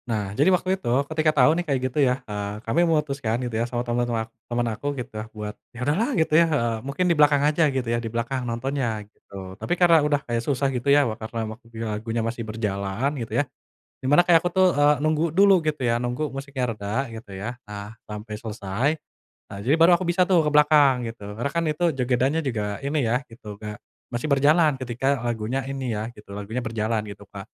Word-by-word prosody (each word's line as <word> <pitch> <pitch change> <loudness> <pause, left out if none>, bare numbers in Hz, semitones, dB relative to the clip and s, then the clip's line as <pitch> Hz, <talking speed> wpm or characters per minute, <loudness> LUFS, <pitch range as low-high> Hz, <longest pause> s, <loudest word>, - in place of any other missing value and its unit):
Nah, 105 -4 -2
jadi 145 - +3
waktu 185 +1 +1
itu - - -3 0.2
ketika 155 0 +2
tahu 135 +4 +6
nih 170 - 0
kayak 140 -3 +1
gitu 150 - -2
ya, 130 -1 +1
eee, 105 -1 -4
kami 115 +9 +2
memutuskan 140 -7 0
gitu 120 - -5
ya 115 +2 -1
sama 120 0 -2
temen-temen 120 -1 -1
ak - - -26 0.2
temen 120 0 0
aku 115 +7 -6
gitu 125 -1 -6 0.2
buat 105 -1 -6 0.2
yaudahlah 150 - 0
gitu, 160 -1 +1
ya, - - +5
eee, 115 -7 0
mungkin 140 +8 -2
di 175 - +4
belakang 145 -2 +4
aja 150 +1 +3
gitu 130 -2 -2
ya 115 0 0
di 115 - -4
belakang 120 +3 -2
nontonnya 115 -3 -2
gitu, 95 -2 -11
tapi 175 - 0
karena 170 -3 +6
udah 145 -1 +2
kayak 120 -1 -1
susah 135 +2 0
gitu 125 +2 -1
ya 145 0 +6 0.2
karena 110 +1 -5
waktunya 115 0 -8
lagunya 115 +2 -2
masih 115 +1 -3
berjalan 105 +2 -1
gitu 115 - -6
ya, - - +3 0.6
dimana 145 +6 +5
kayak 165 -2 +6
aku 175 - +1
tuh, 185 +1 +4
eee, 145 +1 +5
nunggu 155 +1 +1
dulu 190 0 +5
gitu 155 -2 -2
ya, 115 - +2
nunggu 125 +5 -1
musiknya 135 -1 -4
reda 105 +6 -2
gitu 110 -2 -10
ya. 120 +5 -4
Nah, 105 +1 -8
sampai 105 0 -7
selesai 110 +3 -2 0.6
nah 100 - -7
jadi 135 - +3
baru 170 +2 +8
aku 185 - -3
bisa 175 +1 +3
tuh 180 -2 +5
ke - - +1
belakang 145 -4 +5
gitu, 115 -2 -11
karena 120 +5 -1
kan 170 0 0
itu 155 +3 -1
jogedannya 130 +5 +1
juga 105 -4 -2
ini 145 +1 0
ya 115 +1 +1
gitu 110 -3 -10
kayak, 105 -1 -6 0.4
masih 120 +5 -2
berjalan 150 +3 +4
ketika 130 +2 -1
lagunya 120 +2 -1
ini 135 -2 -3
ya 105 +1 -3
gitu, 105 - -14
lagunya 110 +5 -4
berjalan 110 -1 -1
gitu 100 0 -10
Kak, 100 0 -9
125 Hz, 210 wpm, -24 LUFS, 110-150 Hz, 0.6 s, baru